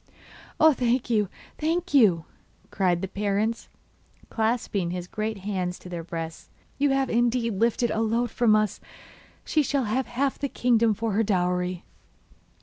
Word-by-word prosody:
'Oh, 315 0 +7
thank 245 -1 0
you, 210 -4 +2 0.3
thank 335 +3 -1
you!' 195 - +5 0.5
cried 180 -2 +1
the - - -1
parents, 205 +3 -1 0.6
clasping 220 -5 0
his 180 0 -4
great 215 +3 -3
hands 185 -2 -3
to 180 - -12
their 170 -2 -5
breasts. 165 -1 -6 0.3
'You 285 0 +3
have 270 -1 +1
indeed 235 -3 +1
lifted 235 +1 +2
a 220 - 0
load 230 +1 0
from 225 -3 +3
us. 215 -2 0 0.6
She 310 - +2
shall 280 -1 0
have 245 +4 -1
half 270 +3 -1
the 280 - -2
kingdom 230 -4 +2
for 225 +1 -2
her 205 +3 +2
dowry. 180 -3 0
220 Hz, 150 wpm, -26 LUFS, 190-245 Hz, 0.6 s, Oh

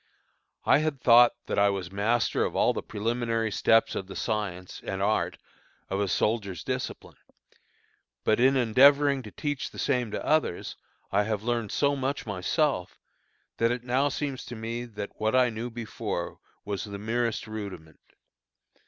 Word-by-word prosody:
I - - +5
had 155 -3 -1
thought 120 -1 +7
that - - -1
I 100 0 +5
was 95 -3 -3
master 110 +4 +1
of - - -2
all - - +3
the - - -3
preliminary 115 +1 -1
steps 115 +2 +3
of 95 - -4
the 95 - -9
science 100 -5 -3
and 95 - -4
art 105 +2 0 0.5
of 95 - 0
a 100 - +1
soldier's 100 0 0
discipline, - - -5 1.1
but 110 - +2
in 135 +2 +5
endeavoring 140 +3 +5
to 110 - -9
teach 145 +4 -3
the - - -14
same 125 -4 0
to - - -4
others, 155 - 0 0.4
I 100 - +3
have 105 -1 -2
learned 115 -3 -1
so 140 0 +2
much 135 +1 -2
myself, 105 - -1 0.6
that 115 - +3
it 120 0 -2
now 130 +3 +2
seems 140 -2 -3
to 120 - -7
me 115 +2 -4
that 105 -3 -8
what 110 +3 +2
I 125 -2 +4
knew 115 +2 -4
before 115 -1 -5 0.3
was 100 -1 -3
the 100 -1 -6
merest 115 +2 -1
rudiment. 100 -8 -8
115 Hz, 160 wpm, -27 LUFS, 100-125 Hz, 1.1 s, thought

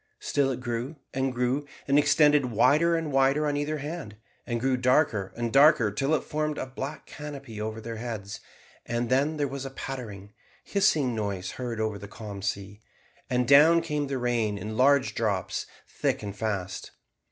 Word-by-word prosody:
Still 140 -2 +1
it 130 -1 -3
grew, 120 +4 -3 0.2
and 135 0 0
grew, 125 +3 -1 0.2
and 140 +1 +5
extended 145 -1 +4
wider 155 +9 +4
and 165 -2 -2
wider 135 +3 +3
on 145 -1 0
either 145 +1 -1
hand, 145 -7 -6 0.3
and 120 -1 -1
grew 130 +2 +1
darker 125 -6 +2
and 120 -1 -2
darker 140 -6 +6
till 135 +9 +1
it - - -2
formed 150 0 -2
a - - -3
black 135 +2 -6
canopy 140 -7 -8
over 110 +1 -4
their 115 0 -6
heads; 110 -4 -5 0.4
and 120 0 -2
then 145 +4 +2
there 145 -1 0
was 135 0 -5
a 135 - -5
pattering, 110 -7 -7 0.3
hissing 160 - +2
noise 100 -4 -3
heard 120 -3 -5
over 110 -2 -1
the 100 - -8
calm 105 -2 -8
sea, 100 +1 -4 0.5
and 125 -1 +1
down 150 +5 +7
came 150 -3 -2
the 135 -1 -2
rain 120 -4 0
in 110 +2 -5
large 135 +2 +4
drops 100 -5 -1 0.2
thick - - -2
and 100 -1 -5
fast. 100 -4 -3
130 Hz, 175 wpm, -27 LUFS, 110-145 Hz, 0.5 s, down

